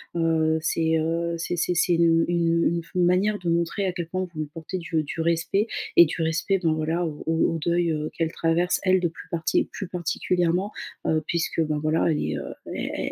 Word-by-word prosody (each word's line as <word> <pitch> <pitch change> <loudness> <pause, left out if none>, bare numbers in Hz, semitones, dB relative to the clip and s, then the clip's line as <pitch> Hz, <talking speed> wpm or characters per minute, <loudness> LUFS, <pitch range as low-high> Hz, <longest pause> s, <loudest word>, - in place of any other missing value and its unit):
heu, - - -1
heu, 160 -1 +2
c'est, 160 0 +1
heu, 170 +1 -1
c'est 170 +1 -2
c'est 180 - +1
c'est 175 +1 +2
une 165 -1 +4
une 170 -1 +2
une 170 0 +1
f - - -20
une 180 -1 +2
manière 200 +4 +2
de 175 -2 -2
montrer 170 +4 0
à - - 0
quel 170 -2 -4
point 185 +3 -2
vous 155 - -9
lui 155 - -2
portez 165 +3 -5
du 165 -2 -1
du 150 - -6
respect 170 +5 +1 0.3
et 170 - +10
du 160 - -4
respect 165 +4 +1
dans 165 -3 +1
voilà, 160 +3 -1
au 150 -2 -5
au 165 0 +1
deuil, 170 +2 +1
heu, 155 0 -2
qu'elle 165 -1 -1
traverse 170 +2 +1
elle 185 -1 +4
de 175 - +1
plus 165 - -11
parti 165 -1 +1
plus 195 - -5
particulièrement, 180 +2 0 0.4
heu, 155 0 +1
puisque, 170 -1 -1
ben, 150 -1 -1
voilà 155 +2 +1
elle 150 - 0
est, 75 -1 -2
heu, 70 - -6 0.2
è - - -3
165 Hz, 225 wpm, -25 LUFS, 160-175 Hz, 0.4 s, et